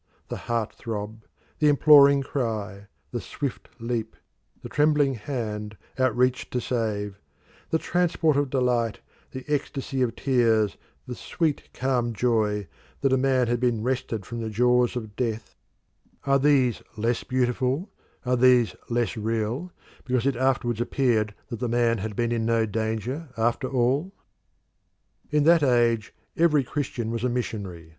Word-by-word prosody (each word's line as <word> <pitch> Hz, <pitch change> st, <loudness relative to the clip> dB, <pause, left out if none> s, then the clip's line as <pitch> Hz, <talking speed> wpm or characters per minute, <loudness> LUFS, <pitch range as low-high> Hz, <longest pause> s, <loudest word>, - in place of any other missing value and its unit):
The -, -, -4 dB
heart 115 Hz, -2 st, -1 dB
throb, 110 Hz, 0 st, -6 dB, 0.3 s
the 150 Hz, -, +4 dB
imploring 140 Hz, -1 st, +7 dB
cry, 110 Hz, -7 st, -3 dB, 0.2 s
the 120 Hz, -, -3 dB
swift 140 Hz, +6 st, -5 dB
leap, 115 Hz, -1 st, -3 dB, 0.5 s
the -, -, -5 dB
trembling 150 Hz, -2 st, +2 dB
hand 110 Hz, -4 st, -5 dB, 0.2 s
out 130 Hz, -3 st, +2 dB
reached 125 Hz, +1 st, +1 dB
to 125 Hz, -, +1 dB
save; 105 Hz, -5 st, -2 dB, 0.5 s
the 160 Hz, -, +2 dB
transport 165 Hz, -3 st, +1 dB
of 145 Hz, -1 st, +1 dB
delight, 125 Hz, -4 st, 0 dB, 0.3 s
the 130 Hz, 0 st, -8 dB
ecstasy 140 Hz, -2 st, -2 dB
of 120 Hz, -2 st, 0 dB
tears, 115 Hz, -6 st, +2 dB, 0.3 s
the 125 Hz, -, -6 dB
sweet, 155 Hz, +4 st, -2 dB
calm 125 Hz, -2 st, 0 dB
joy 105 Hz, -3 st, 0 dB, 0.3 s
that 135 Hz, -1 st, +2 dB
a -, -, +6 dB
man 130 Hz, -1 st, +2 dB
had 120 Hz, 0 st, 0 dB
been 120 Hz, -3 st, 0 dB
wrested 125 Hz, -5 st, -2 dB
from 115 Hz, +2 st, -5 dB
the 110 Hz, -, -3 dB
jaws 125 Hz, +3 st, +2 dB
of 110 Hz, -4 st, -6 dB
death 115 Hz, -2 st, -3 dB, 0.7 s
are 140 Hz, 0 st, +3 dB
these 135 Hz, -5 st, +3 dB, 0.2 s
less 115 Hz, +2 st, 0 dB
beautiful, 130 Hz, -, 0 dB, 0.3 s
are 125 Hz, 0 st, +2 dB
these 125 Hz, -2 st, +4 dB
less 120 Hz, -1 st, 0 dB
real, 115 Hz, +9 st, -2 dB, 0.3 s
because 125 Hz, -1 st, 0 dB
it 140 Hz, -2 st, +2 dB
afterwards 120 Hz, -2 st, 0 dB
appeared 115 Hz, -5 st, +1 dB
that 115 Hz, -4 st, -5 dB
the 125 Hz, -1 st, -2 dB
man 120 Hz, -1 st, +2 dB
had 105 Hz, +1 st, -4 dB
been 120 Hz, +1 st, 0 dB
in 115 Hz, -1 st, 0 dB
no 115 Hz, 0 st, +2 dB
danger 110 Hz, +7 st, -3 dB
after 120 Hz, +3 st, 0 dB
all? 135 Hz, +7 st, +1 dB, 1.2 s
In 150 Hz, 0 st, +2 dB
that 165 Hz, +1 st, +6 dB
age 120 Hz, -4 st, +2 dB, 0.2 s
every 155 Hz, -4 st, +3 dB
Christian 125 Hz, -4 st, -3 dB
was 115 Hz, 0 st, -3 dB
a 125 Hz, -, +2 dB
missionary. 100 Hz, -9 st, -4 dB
120 Hz, 150 wpm, -25 LUFS, 110-135 Hz, 1.2 s, imploring